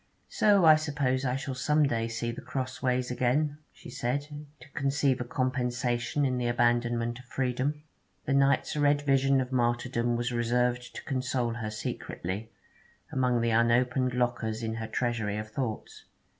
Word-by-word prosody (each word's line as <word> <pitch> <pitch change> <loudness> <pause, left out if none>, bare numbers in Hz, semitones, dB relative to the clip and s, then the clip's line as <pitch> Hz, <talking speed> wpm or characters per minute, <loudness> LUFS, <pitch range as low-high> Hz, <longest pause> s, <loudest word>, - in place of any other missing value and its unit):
'So 200 -4 +4
I 155 -1 +8
suppose 140 -4 -1
I 125 -1 0
shall 135 0 -4
some 150 +4 +2
day 115 -5 0
see 115 +1 -3
The 115 - -8
Crossways 130 -1 -2
again,' 145 +5 0
she - - -12
said, 140 +4 -2 0.3
to 125 - -14
conceive 135 -2 +1
a - - 0
compensation 125 +1 -1
in 125 -2 0
the 120 - 0
abandonment 120 0 +1
of 125 - -14
freedom. 130 +4 -2 0.4
The 135 - 0
night's 140 0 +2
red 145 -1 +2
vision 135 -1 +3
of 130 0 -2
martyrdom 120 -1 0
was 120 +1 -1
reserved 125 +1 0
to - - -7
console 125 -4 -1
her 115 -2 -4
secretly, 105 0 -5 0.6
among 125 -2 +1
the 115 0 +1
unopened 125 +2 +2
lockers 120 -2 -1
in 110 0 -2
her 110 0 -4
treasury 115 -4 -1
of 110 0 -6
thoughts. 115 -2 -5
125 Hz, 155 wpm, -29 LUFS, 120-135 Hz, 0.6 s, I